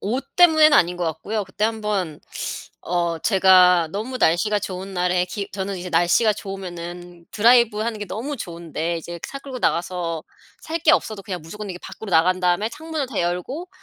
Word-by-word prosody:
옷 250 +7 -2
때문에는 315 -4 +7
아닌 175 0 +3
것 175 - -2
같고요. 170 +7 -3
그때 195 +3 -3
한번 210 -8 -2 0.6
어 170 -1 -1
제가 180 -3 +5
너무 225 +6 -4
날씨가 210 +5 +2
좋은 190 0 -6
날에 180 0 +1
기 200 +1 -5
저는 195 0 -3
이제 180 +1 -6
날씨가 175 +7 +3
좋으면은 175 -3 -8
드라이브하는 230 -1 +3
게 205 - -4
너무 270 +10 -4
좋은데 170 - -4
이제 170 +1 -8
차 275 - -6
끌고 270 -2 -8
나가서 170 -2 -1 0.4
살 330 +1 -3
게 310 - +5
없어도 215 -3 0
그냥 180 -4 -5
무조건 205 +5 -7
이렇게 180 - -7
밖으로 215 -3 -8
나간 180 +3 +3
다음에 180 +4 +1
창문을 315 -2 -4
다 225 -8 -2
열고 180 - -3
190 Hz, 375 characters per minute, -22 LUFS, 175-220 Hz, 0.6 s, 때문에는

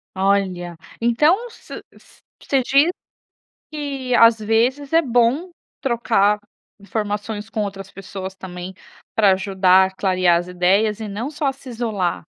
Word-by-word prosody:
Olha, 190 -3 0 0.2
então, 305 - +2
se 460 - -14 0.2
s - - -22 0.2
você 270 -2 +1
diz 280 +7 +3 0.8
que, 275 -4 -4
às 230 -1 +6
vezes, 240 +6 0
é 330 - +6
bom 255 +6 +1 0.3
trocar 225 -5 +2 0.4
informações 210 +1 -4
com 220 -2 -2
outras 195 -1 -6
pessoas 190 0 -8
também 185 0 -8 0.4
para 205 -3 +5
ajudar 190 -1 +4
a 190 - -13
clarear 185 -2 +2
as 175 +1 -4
ideias 195 +4 +1
e 220 - -5
não 210 +6 -4
só 300 -1 -4
a 270 - 0
se 270 -1 -13
isolar? 220 -9 -2
210 Hz, 140 wpm, -20 LUFS, 190-250 Hz, 0.8 s, às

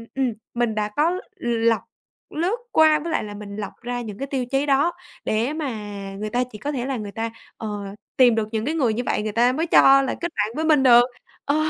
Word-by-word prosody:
ừm, 260 -4 0 0.2
mình 235 -2 0
đã 210 0 -1
có 335 +5 +2 0.2
lọc, 230 -2 +1 0.6
lướt 355 +9 0
qua 310 -1 +5
với 330 +2 -5
lại - - 0
là 205 -1 -7
mình 205 -1 -8
lọc 210 -1 -5
ra 245 0 -3
những 210 -3 -7
cái 275 - -4
tiêu 265 -3 -2
chí 270 +3 0
đó, 285 +4 +3 0.3
để 230 +7 0
mà 310 -3 -3 0.5
người 215 0 -3
ta 245 +3 +1
chỉ 210 - -8
có 285 +8 -3
thể 250 -3 -3
là 265 -1 -2
người 210 -2 -6
ta, 225 +1 -3 0.3
ờ, 220 - -5 0.5
tìm 245 -3 +6
được 220 -1 0
những 220 +1 -2
cái 310 - -1
người 250 -9 +2
như 245 +3 -2
vậy - - 0
người 215 - -2
ta 240 +3 +3
mới 320 +6 -1
cho 275 -3 +7
là 270 - -2
kết 345 -1 -2
bạn 215 +2 -1
với 315 +1 -1
mình 300 -4 +4
được, 240 -1 +8 0.4
ờ. 285 - +1
245 Hz, 240 wpm, -23 LUFS, 220-290 Hz, 0.6 s, được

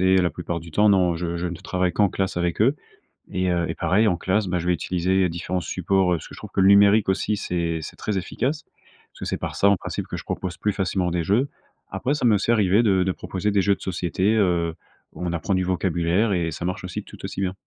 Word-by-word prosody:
Et 95 0 +4
la 90 -2 +3
plupart 85 -1 -4
du 85 0 -12
temps, 105 +5 +4
non, 90 -4 +3
je 85 0 -3
je 90 +1 -2
ne 85 - -4
travaille 90 +1 -1
qu'en 105 -2 +3
classe 95 0 -2
avec 85 +1 -1
eux. 130 +7 +4 0.6
Et 95 0 0
heu, 85 -1 +1
et - - -2
pareil, 105 +4 +2
en 90 -4 +1
classe, 100 +4 0
bah, 90 -1 -1
je 85 - -4
vais 90 - +3
utiliser 90 +2 +1
différents 85 +2 -3
supports, 90 +2 +1
heu, - - +1
parce - - -10
que - - -11
je - - -12
trouve - - -10
que 95 - +2
le 95 - +5
numérique 100 +1 +6
aussi 100 +2 0
c'est 85 -4 -2
c'est - - -8
très 105 -3 -2
efficace, 140 - -2 0.5
parce - - -19
que - - -3
c'est - - -2
par - - -4
ça 100 - +4
en 100 - +5
principe - - -5
que - - -5
je - - -7
propose 90 -2 -4
plus 105 - 0
facilement 95 -2 0
des 85 0 -1
jeux. 120 - +1 0.4
Après 135 - -1
ça 150 -4 -1
m’est 115 -3 +5
aussi 105 +3 +1
arrivé 105 0 +3
de 95 -4 +3
de 95 0 +1
proposer 95 +3 -3
des 100 -1 +3
jeux 100 +1 +3
de - - -23
société, 95 +3 0
heu, 85 -5 +1 0.4
où 90 - -6
on 85 - -2
apprend 85 +4 -1
du 95 0 +1
vocabulaire 90 +3 +1
et 85 -2 0
ça 80 - -6
marche 90 +1 -3
aussi, 90 - -5
tout - - -13
aussi - - -5
bien. 95 -1 -1
95 Hz, 265 wpm, -23 LUFS, 85-100 Hz, 0.6 s, numérique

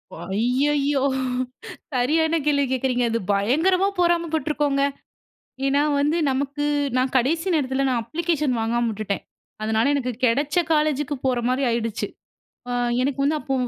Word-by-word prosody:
ஓ! - - -10 0.2
ஐயயோ! 275 +5 +1 0.9
சரியான 315 +6 +2
கேள்வி 285 -1 +3
கேக்குறீங்க 250 -1 +1
அது 230 - 0
பயங்கரமா 320 - +2
பொறாம 345 -1 +2
பட்ருக்கோங்க. 295 -2 0 0.8
ஏன்னா 280 +1 +3 0.2
வந்து 300 +4 +2
நமக்கு 280 +2 -2 0.3
நான் 255 +1 0
கடைசி 325 +8 +1
நேரத்தில 270 -2 0
நான் 245 -2 0
அப்ளிகேஷன் 305 0 -1
வாங்காம 235 +1 0
உட்டுட்டேன். 205 -1 -3 0.4
அதனால 220 +5 +2
எனக்கு 260 -3 -1
கெடச்ச 280 +7 +2 0.2
காலேஜுக்கு 300 -2 +1
போற 255 -2 +2
மாரி 260 +2 0
ஆயிடுச்சு. 230 -2 -2 0.6
அ - - -1 0.3
எனக்கு 275 +1 -1
வந்து, 305 +2 +2
அப்போ 270 - -2
275 Hz, 130 wpm, -23 LUFS, 245-300 Hz, 0.9 s, கேள்வி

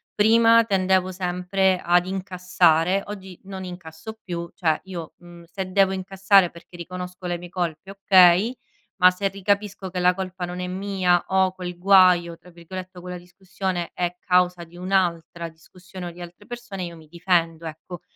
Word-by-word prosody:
Prima 230 +2 +5
tendevo 190 -3 +1
sempre 185 +1 0
ad 175 +1 +3
incassare, 185 -1 +1
oggi 190 -3 -9
non 190 -1 -7
incasso 175 +4 -9
più, 170 -2 -5
cioè 160 -4 +1
io, 175 -4 -8
mhmm, 175 -1 -14
se 190 +1 -5
devo 195 0 +3
incassare 190 0 +3
perché 170 +1 -15
riconosco 180 +1 -8
le 175 -1 -2
mie 175 0 -10
colpe 175 0 -4
okay, 195 +3 +5 0.5
ma 180 - +9
se 195 +2 -2
ricapisco 200 0 -2
che 180 0 -4
la 180 0 +4
colpa 185 -1 -5
non 180 +1 -6
è 180 - -3
mia 185 -2 0
o 190 -1 +2
quel 180 -1 -6
"guaio" 180 -2 +5
tra 180 - -18
virgolette, 180 +2 -9
o - - -12
quella 180 0 -7
discussione 180 0 -5
è 175 0 -2
causa 180 -1 +1
di 170 +1 -15
un’altra 175 -2 -1
discussione 175 +3 -11
o - - -6
di 175 +1 -13
altre 175 +4 -11
persone 240 -5 -7
io 170 -1 -6
mi 160 -1 -16
difendo. 170 -1 0
Ecco, 165 +3 -8
180 Hz, 170 wpm, -23 LUFS, 175-190 Hz, 0.5 s, ma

